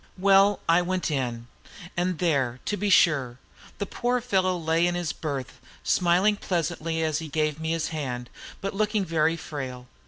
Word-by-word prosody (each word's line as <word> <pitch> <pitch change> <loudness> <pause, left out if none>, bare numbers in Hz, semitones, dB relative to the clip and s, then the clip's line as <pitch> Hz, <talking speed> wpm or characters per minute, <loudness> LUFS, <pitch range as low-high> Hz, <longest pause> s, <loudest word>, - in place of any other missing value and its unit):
Well, 195 +1 +5
I 165 +1 +5
went 180 -2 -1
in, 120 -4 -2 0.5
and 180 0 0
there, 140 -8 0
to 210 - 0
be 205 +1 -1
sure, 135 -10 +4 0.4
the 200 - -2
poor 245 +5 -1
fellow 190 -6 +1
lay 165 +1 +2
in 175 - -1
his 175 -3 -2
berth, 135 -5 -5 0.2
smiling 185 +4 +3
pleasantly 165 -3 -2
as 155 -1 0
he 160 - -6
gave 155 0 -1
me 160 0 -3
his 165 -1 -1
hand, 125 -6 -4 0.3
but 195 - -3
looking 210 0 0
very 165 -1 +1
frail. 130 -6 -6
165 Hz, 165 wpm, -26 LUFS, 150-185 Hz, 0.5 s, Well